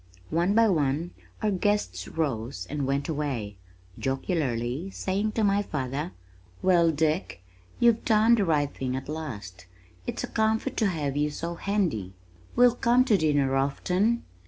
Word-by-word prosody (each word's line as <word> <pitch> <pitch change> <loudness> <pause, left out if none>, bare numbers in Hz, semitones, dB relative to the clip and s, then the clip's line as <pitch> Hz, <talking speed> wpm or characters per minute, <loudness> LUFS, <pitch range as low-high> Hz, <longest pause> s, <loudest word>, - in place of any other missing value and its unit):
One 175 +5 +2
by 230 0 +6
one 155 -1 +1 0.3
our 215 - +2
guests 185 - 0
rose 120 - -3
and 145 -2 -2
went 140 +1 0
away, 135 -10 -3 0.4
jocularly 135 +1 -1
saying 200 +3 -2
to 225 - 0
my 200 0 +3
father, 145 -2 -3 0.5
"Well, 175 -3 +5
Dick, 155 - -1 0.4
you've 235 -1 +4
done 220 0 +4
the 215 -4 +3
right 145 -4 +1
thing 130 -1 -3
at 135 0 -5
last. 105 - -6 0.4
It's - - -3
a - - -2
comfort 220 0 0
to 220 - +3
have 150 -7 -2
you 150 +1 +1
so 170 +3 -4
handy. 170 - -1 0.4
We'll 245 -1 +6
come 245 +1 +3
to 220 - +4
dinner 145 -5 +2
often." 180 +12 +1
160 Hz, 150 wpm, -27 LUFS, 135-200 Hz, 0.5 s, by